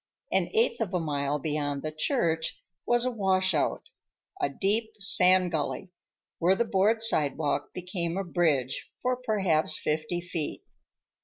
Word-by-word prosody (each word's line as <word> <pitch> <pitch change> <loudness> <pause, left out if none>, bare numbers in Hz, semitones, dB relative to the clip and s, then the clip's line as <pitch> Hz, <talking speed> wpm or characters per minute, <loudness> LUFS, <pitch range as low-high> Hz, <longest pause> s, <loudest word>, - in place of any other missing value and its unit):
An - - +1
eighth 455 - +2
of 195 -4 -1
a - - +2
mile 145 -2 -1
beyond 145 -1 -2
the 155 - -3
church 160 - -1 0.3
was 240 0 +3
a 255 - 0
washout, 190 -7 +1 0.6
a - - +1
deep 210 +9 0
sand 185 -2 +4
gully, 160 +3 -3 0.5
where 180 +3 +4
the 235 - +1
board 215 +2 +2
sidewalk 150 - +1
became 180 -1 -3
a 195 - -1
bridge 155 -8 0
for 255 0 +1
perhaps 195 -11 +1
fifty 155 +3 -2
feet. 170 -3 -4
175 Hz, 140 wpm, -28 LUFS, 155-200 Hz, 0.6 s, sand